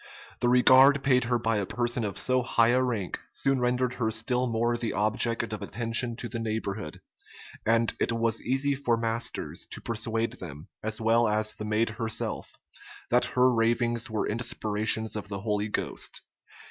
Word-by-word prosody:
The 120 - +2
regard 130 +2 +6
paid 125 -2 +3
her 120 +1 +1
by 115 -1 0
a 100 - -1
person 120 -1 0
of 100 -2 -4
so 130 0 +2
high 115 -1 +2
a 125 +2 +3
rank, 115 -7 -2
soon 135 -1 +1
rendered 125 0 0
her 110 - +2
still 125 +3 0
more 120 +1 0
the 115 -1 -3
object 110 +2 +1
of 105 - -5
attention 115 +3 -1
to 120 - -5
the 115 0 -5
neighborhood; 110 -6 -4 0.7
and 115 0 +3
it - - +1
was 115 -1 0
easy 135 +3 +1
for 135 -4 0
Masters 115 0 -3
to - - -7
persuade 115 0 -2
them, 75 -3 -9
as 110 0 -3
well 115 +1 +3
as 105 0 0
the 105 - -7
maid 110 +2 +1
herself, 110 0 -3 0.5
that 125 +1 +4
her 125 0 +5
ravings 120 +1 +1
were 110 -2 -1
inspirations 110 -1 0
of 105 -1 -5
the 100 -1 -5
Holy 105 0 -1
Ghost. 105 - -3
115 Hz, 170 wpm, -27 LUFS, 110-125 Hz, 0.7 s, regard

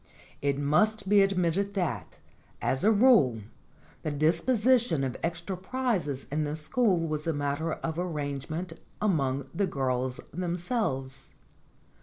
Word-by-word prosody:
It 140 -1 +1
must 200 +9 +2
be 205 0 +6
admitted 195 +1 +1
that, 135 - -2 0.4
as 130 - -1
a 215 - +5
rule, 205 - +5 0.6
the - - -2
disposition 175 - +2
of 130 -2 -2
extra 170 +3 -3
prizes 185 - -2
in 155 +1 0
this 150 +1 -3
school 210 +3 +2
was 155 0 -3
a 165 - +2
matter 145 +3 -1
of 165 0 -4
arrange 145 -6 -3
ment 165 +2 -4 0.3
among 140 -10 +1
the 200 -1 +1
girls 130 -4 -1
themselves. 170 - -2
165 Hz, 130 wpm, -28 LUFS, 140-200 Hz, 0.6 s, be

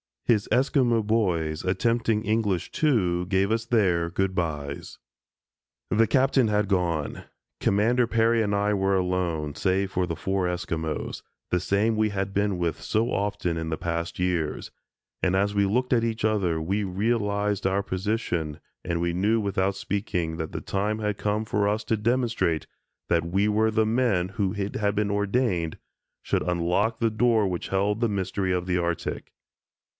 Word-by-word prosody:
His 105 -4 +2
Esquimo 125 -2 +2
boys, 90 -8 0
attempting 110 +3 +1
English, 105 -5 0
too, 90 - +1
gave 95 +2 +1
us 115 0 0
their 90 -8 +2
"Good 95 +2 -1
bys." 75 -5 -4 0.9
The 110 +1 +4
Captain 130 -2 +3
had 105 -1 +1
gone. 85 -6 -1 0.3
Commander 115 +5 +2
Peary 115 0 +3
and 105 -2 0
I 105 +1 +1
were 95 -1 +1
alone 90 -5 -1
(save 95 0 0
for 90 -1 0
the 85 - -3
four 95 +2 -1
Esquimos), 80 -3 -3 0.3
the 90 - +2
same 105 +5 +1
we 110 0 +2
had 100 -1 -3
been 100 -1 +1
with 85 -2 -2
so 110 +2 0
often 100 -4 -1
in 80 0 -3
the 80 - -2
past 85 0 -3
years, 90 -4 -1 0.5
and 95 0 +2
as 100 +1 +1
we 100 -1 +3
looked 125 +6 0
at 115 -2 +3
each 115 -2 -2
other 95 -7 +1
we 100 +6 -1
realized 105 0 0
our 95 +1 +1
position 95 -6 -2 0.3
and 85 -1 -1
we 85 0 0
knew 105 +6 +2
without 100 -1 0
speaking 90 -5 -2
that 80 -1 -5
the - - -4
time 105 +2 -1
had 105 -2 -1
come 105 +1 -1
for 105 -2 0
us 105 +2 0
to 110 0 0
demonstrate 115 -7 0 0.4
that 85 -1 +2
we 95 +5 +1
were 110 +1 +2
the 110 0 +2
men 110 -6 +1
who 100 -1 -1
it 100 0 -3
had 105 -1 0
been 105 0 0
ordained, 100 -5 0 0.5
should - - 0
unlock 90 +6 +1
the 115 -1 +2
door 110 -2 +3
which 90 -2 -3
held 100 +2 0
the 115 -1 +1
mystery 95 -1 -1
of 90 -1 -1
the 90 -1 0
Arctic. 85 -1 -3
100 Hz, 170 wpm, -26 LUFS, 90-110 Hz, 0.9 s, The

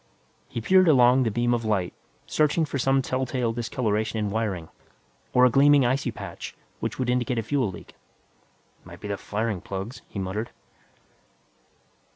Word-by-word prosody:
He 115 - -4
peered 185 +8 +5
along 130 -3 +6
the 120 - +2
beam 120 +2 +1
of 120 -1 0
light, 105 -5 0 0.3
searching 155 +2 +2
for 140 -2 -4
some 135 +1 +2
telltale 130 -2 -1
discoloration 115 -2 -1
in 105 -2 -1
wiring, 100 -7 -2 0.6
or 125 0 +5
a 125 - +4
gleaming 140 +1 +5
icy 130 +3 +1
patch - - -8 0.2
which - - -3
would 130 - -1
indicate 125 0 0
a 115 - 0
fuel 130 -1 0
leak. 90 - -11 0.9
"Might - - -12
be - - -7
the 100 - -2
firing 105 -1 -3
plugs," 100 +6 -6
he - - -9
muttered. 100 +4 -3
120 Hz, 160 wpm, -25 LUFS, 105-130 Hz, 0.9 s, along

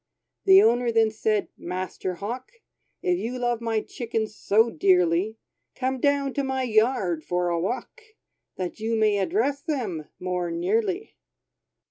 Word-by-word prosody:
The 385 0 +8
owner 240 +1 +3
then 225 -1 +3
said, 215 -1 0
"Master 185 +1 -4
Hawk, 240 - -6 0.5
If 360 -1 +1
you 245 +3 -3
love 240 -1 -1
my 225 -2 0
chickens 225 -3 -4
so 225 +4 +3
dearly, 180 +4 +2 0.4
Come 260 0 -1
down 280 0 +1
to 280 - -1
my 265 -1 -1
yard 215 -8 +1
for 180 +1 0
a 170 -1 0
walk, 200 +9 -4 0.5
That 185 +3 -5
you 225 +1 -1
may 215 -2 +3
address 285 - 0
them 225 - -3
more 180 -1 -2
nearly." 215 - -1
225 Hz, 140 wpm, -25 LUFS, 185-255 Hz, 0.5 s, The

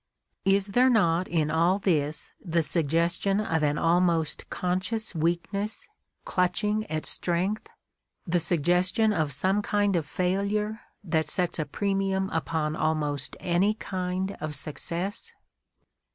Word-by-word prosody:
Is 195 0 +3
there 255 +1 +5
not 180 -7 +3
in 155 -3 0
all 170 +4 +3
this 155 -6 -1
the 170 -3 +1
suggestion 170 +5 +1
of 165 -7 0
an 150 0 +1
almost 170 -2 +1
conscious 185 +5 -2
weakness 175 +6 -1 0.4
clutching 210 +4 0
at 155 -1 -2
strength, 185 +5 -1 0.6
the 175 0 +1
suggestion 180 +6 +2
of 155 -6 0
some 190 +9 +1
kind 205 -1 +1
of 160 -4 -1
failure 200 +6 -1 0.2
that 160 -4 0
sets 180 -2 -1
a 155 - 0
premium 195 +3 -1
upon 160 -1 -1
almost 150 -4 -1
any 185 +4 +1
kind 185 -1 -3
of 155 -1 -3
success 170 +7 -1
180 Hz, 125 wpm, -27 LUFS, 160-200 Hz, 0.6 s, there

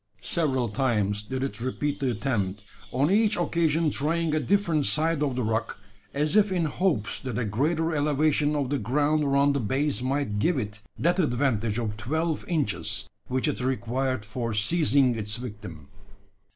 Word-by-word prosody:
Several 135 -7 0
times 105 -3 0
did 130 +5 -4
it 135 -3 -4
repeat 140 +3 -2
the 135 - 0
attempt 105 -5 -2 0.3
on 140 +6 +2
each 215 +1 +3
occasion 165 -2 +1
trying 160 +3 0
a 155 - +2
different 160 -1 +1
side 160 0 +1
of 140 -4 0
the 125 - -1
rock 110 +1 -1 0.3
as 150 +5 0
if 210 -2 +4
in 175 -3 +1
hopes 150 - 0
that 125 -4 -4
a 120 - 0
greater 160 +10 0
elevation 150 0 +2
of 140 -2 -1
the 145 - +1
ground 145 +7 +1
around 140 0 +3
the 140 - 0
base 135 +4 0
might 130 -5 -1
give 165 +8 +2
it 105 -4 -4 0.2
that 175 +3 +1
advantage 120 - +1
of 110 -3 -2
twelve 160 +7 -1
inches 105 - -1 0.2
which 130 +3 0
it 150 - -1
required 130 -1 -1
for 115 +1 -3
seizing 135 +2 +3
its 105 -2 -3
victim. 105 - -8
135 Hz, 165 wpm, -26 LUFS, 115-155 Hz, 0.3 s, if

